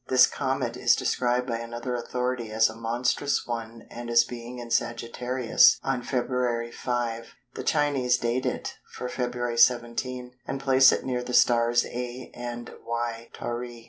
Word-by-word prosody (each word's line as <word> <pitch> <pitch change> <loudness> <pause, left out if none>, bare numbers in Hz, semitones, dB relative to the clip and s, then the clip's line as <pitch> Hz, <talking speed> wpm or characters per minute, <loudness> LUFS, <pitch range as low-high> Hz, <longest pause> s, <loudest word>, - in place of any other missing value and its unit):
This 130 -1 +7
Comet - - -2
is - - +4
described 125 0 0
by 115 -2 -2
another 120 +2 -5
authority 125 -1 -2
as 110 0 +3
a - - -12
"monstrous" 120 +5 0
one 115 -1 -6
and 120 0 -7
as 115 0 +6
being 120 +1 -8
in 120 -1 -8
Sagittarius 120 +1 +3
on 135 -2 -1
Feb. 125 -2 -1
5. 115 -2 -3 0.2
The - - -6
Chinese 140 -5 +2
date 125 +2 -1
it - - -4
for 125 - -5
Feb. 120 -1 -2
17, 125 +1 +2 0.2
and 135 - -3
place 135 -1 +6
it - - -2
near 125 -1 -1
the 125 0 -3
stars 120 0 +4
α 125 +1 -6
and 120 0 -6
γ 115 0 -4
Tauri. 120 0 -5
120 Hz, 155 wpm, -26 LUFS, 115-125 Hz, 0.2 s, This